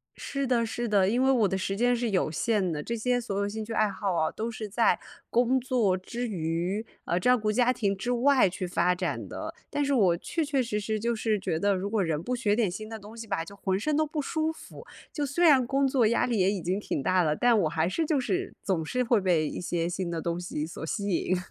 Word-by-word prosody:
是 275 -1 -3
的 235 -2 +2
是 240 +1 -3
的。 200 -2 +3
因 245 +4 +2
为 270 - +4
我 230 -6 +3
的 190 0 -1
时 195 +1 -2
间 245 +3 +2
是 235 -1 -1
有 185 -5 +1
限 200 0 0
的， 150 -1 -3
这 235 - -3
些 245 +2 +1
所 205 -4 -4
有 200 0 0
兴 215 +1 -4
趣 225 +1 -6
爱 215 -1 +2
好 195 -1 -2
啊， 160 -1 +1
都 225 +2 -4
是 220 -1 -6
在 225 +3 +2 0.3
工 250 +2 +3
作 235 -7 +1
之 240 +6 -5
余， 175 +3 -2 0.2
啊， 175 - 0
照 250 +6 +4
顾 215 -1 0
家 245 +2 +3
庭 200 -5 0
之 220 +6 -3
外 250 -3 +4
去 185 +1 -4
发 180 0 +1
展 - - -3
的。 - - -6 0.2
但 290 - -1
是 280 - +1
我 185 -8 +4
确 325 - -2
确 280 -3 0
实 210 -3 -2
实 215 +1 -2
就 235 +1 0
是 215 -2 0
觉 175 -4 -2
得， 200 0 +2
如 195 +2 -3
果 215 -2 +1
人 160 -2 -1
不 250 +4 -1
学 210 -4 +1
点 220 -5 +2
新 215 +3 -6
的 225 - -6
东 210 +3 -12
西 225 -1 -8
吧， 165 - -1
就 200 - -11
浑 190 -1 -1
身 300 +6 0
都 310 - +3
不 300 0 -3
舒 315 +2 -1
服。 320 - -12 0.3
就 295 -2 -1
虽 310 +6 -1
然 270 -6 +6
工 275 +1 +2
作 255 -4 +3
压 235 - +2
力 235 -5 0
也 190 +2 +3
已 195 -4 -3
经 185 +4 -1
挺 145 - -3
大 185 +4 +3
了， 150 -1 +1
但 240 +2 +3
我 155 - +1
还 165 +1 0
是 320 - -1
就 295 -3 +1
是 375 +8 -2
总 180 -5 0
是 250 +8 0
会 235 -3 +3
被 170 -5 +2
一 - - -5
些 170 -1 -1
新 180 -1 -3
的 165 -1 -3
东 170 0 -2
西 155 -4 -4
所 165 - -8
吸 200 +4 -2
引。 185 0 +1
215 Hz, 285 characters per minute, -28 LUFS, 185-245 Hz, 0.3 s, 然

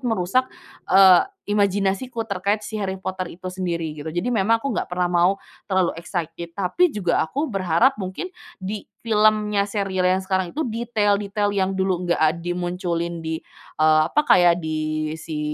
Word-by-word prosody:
merusak, 235 +1 0 0.4
eee, 190 -1 +8 0.3
imajinasiku 205 +4 0
terkait 200 +1 -1
si 215 0 -5
Harry 190 -1 -2
Potter 190 -1 -4
itu 185 - -30
sendiri 170 -4 -3
gitu. 150 +1 -7
Jadi 175 +5 -2
memang 225 +1 +3
aku 275 +4 -3
nggak - - -2
pernah 180 0 -1
mau 175 +2 +4 0.4
terlalu 185 -2 +2
excited 170 0 -5
tapi 200 - +2
juga 195 - 0
aku 285 - -1
berharap 195 +7 +2
mungkin 190 - -5 0.2
di 200 +1 -6 0.2
filmnya 210 -2 +2
serial 195 -3 0
yang 185 +1 +1
sekarang 190 -2 -1
itu 315 - 0
detail-detail 210 -3 0
yang 195 -1 0
dulu 185 -2 -1
nggak 175 - +3
ad 160 +2 +2
dimunculin 175 -1 -3
di, 160 0 -3 0.4
eee, 155 0 +5
apa 300 - +1
kayak 175 -1 +5
di 155 0 -2
si 160 -1 -5
190 Hz, 160 wpm, -22 LUFS, 175-210 Hz, 0.4 s, eee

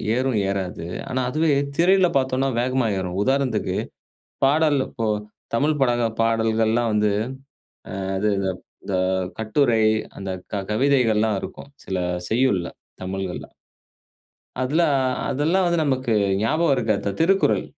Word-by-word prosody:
ஏறும், 130 -2 0
ஏறாது. 95 -3 -3 0.2
ஆனா, 130 0 -1
அதுவே 155 +2 +2 0.3
திரையில 185 +1 +4
பார்த்தோனா, 130 0 0
வேகமா 130 -1 +1
ஏறும். 90 0 -4
உதாரணத்துக்கு 135 +1 0 0.7
பாடல் 150 +1 +3
இப்போ, 115 -4 -3 0.5
தமிழ் 150 +5 +1
பட 130 -2 +4 0.3
பாடல்கள்லா 115 0 +2
வந்து, 105 0 +2 0.9
அ - - -3 0.2
அது 105 +2 +1
இது 95 -1 0 0.3
இந்த 100 - -3 0.4
கட்டுரை, 110 +1 +2 0.4
அந்த 95 -1 -5 0.2
க 100 -1 -2
கவிதைகள்லாம் 110 -4 +2
இருக்கும். 140 - -8
சில 95 - -3 0.3
செய்யுள்ல, 110 -7 +2 0.4
தமிழ்கள்ல. 95 -1 -4 1.2
அதுலா. 150 +7 +2 0.4
அதெல்லாம் 165 +7 +1
வந்து 170 -2 +1
நமக்கு 130 -4 0 0.3
ஞாபகம் 155 +7 +2
இருக்காது. 110 -5 0
த - - +1
'திருக்குறள்.' 190 +4 +3
125 Hz, 120 wpm, -23 LUFS, 105-140 Hz, 1.2 s, திரையில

